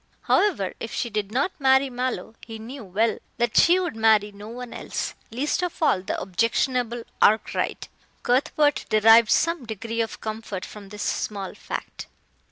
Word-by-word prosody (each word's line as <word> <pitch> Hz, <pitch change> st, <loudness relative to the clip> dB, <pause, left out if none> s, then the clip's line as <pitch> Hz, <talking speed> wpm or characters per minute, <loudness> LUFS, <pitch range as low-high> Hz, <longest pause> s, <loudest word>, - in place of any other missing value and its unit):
However, 300 Hz, -, +2 dB
if 230 Hz, -, -6 dB
she 235 Hz, -, -3 dB
did 210 Hz, -1 st, -2 dB
not 275 Hz, +10 st, +1 dB
marry 265 Hz, 0 st, +4 dB
Mallow, 250 Hz, -2 st, -3 dB
he 225 Hz, -1 st, -8 dB
knew 240 Hz, +4 st, -8 dB
well 215 Hz, +4 st, 0 dB, 0.2 s
that 240 Hz, -2 st, 0 dB
she 350 Hz, +2 st, +6 dB
would 355 Hz, -9 st, -3 dB
marry 220 Hz, -2 st, +3 dB
no 205 Hz, +1 st, -11 dB
one 245 Hz, +1 st, -8 dB
else, -, -, -4 dB, 0.2 s
least 270 Hz, +10 st, -1 dB
of 360 Hz, -1 st, -2 dB
all 295 Hz, -, +3 dB
the 190 Hz, -, -3 dB
objectionable 230 Hz, +4 st, 0 dB, 0.2 s
Arkwright, 215 Hz, +1 st, +2 dB, 0.4 s
Cuthbert 275 Hz, +3 st, +2 dB
derived 225 Hz, +1 st, +6 dB
some 335 Hz, -3 st, +2 dB
degree 230 Hz, +1 st, -3 dB
of 225 Hz, -, -4 dB
comfort 215 Hz, -3 st, -5 dB
from 205 Hz, -2 st, -11 dB
this 210 Hz, 0 st, -6 dB
small 200 Hz, -3 st, -3 dB
fact. -, -, -7 dB
230 Hz, 160 wpm, -24 LUFS, 215-260 Hz, 0.4 s, she